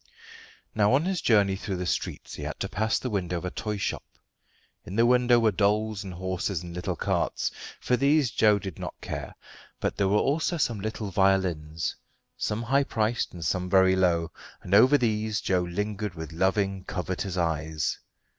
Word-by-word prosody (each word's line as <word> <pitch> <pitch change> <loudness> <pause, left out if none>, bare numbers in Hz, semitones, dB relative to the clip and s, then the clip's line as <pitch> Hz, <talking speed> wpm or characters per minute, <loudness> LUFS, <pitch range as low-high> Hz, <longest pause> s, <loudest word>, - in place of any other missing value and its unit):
Now 105 +1 +3
on 145 +5 +3
his 185 -2 -1
journey 100 -4 +3
through 95 0 -4
the 90 0 -3
streets - - -3
he - - -7
had - - -5
to - - 0
pass 110 +2 0
the 125 - -4
window 90 -4 -1
of 85 - -5
a 90 - -3
toy 105 -1 -3
shop. - - -2 0.8
In 90 - -8
the 115 +2 +4
window 125 0 +5
were 115 -2 +3
dolls 105 +1 +1
and 95 -3 -7
horses 95 0 -2
and 85 -1 -8
little 90 0 -3
carts. - - -1 0.3
For 125 - +1
these 140 0 +3
Joe 105 -2 +4
did 95 -4 -7
not - - -6
care, - - -6 0.4
but - - -2
there 100 - +2
were 100 +2 +3
also 160 +8 +1
some 120 -8 0
little 110 0 -4
violins, 85 -5 +1 0.4
some 105 +2 -2
high 135 +4 +3
priced, 115 -3 -1
and 85 -2 -6
some 90 +1 -1
very 95 0 +5
low, 85 -3 +2 0.3
and 90 - -4
over 125 +8 +7
these 110 -4 0
Joe 90 -2 +1
lingered 105 +2 -3
with 80 0 -7
loving, 95 +2 0
covetous 95 +1 -3
eyes. 80 -3 -1
100 Hz, 185 wpm, -27 LUFS, 90-110 Hz, 0.8 s, over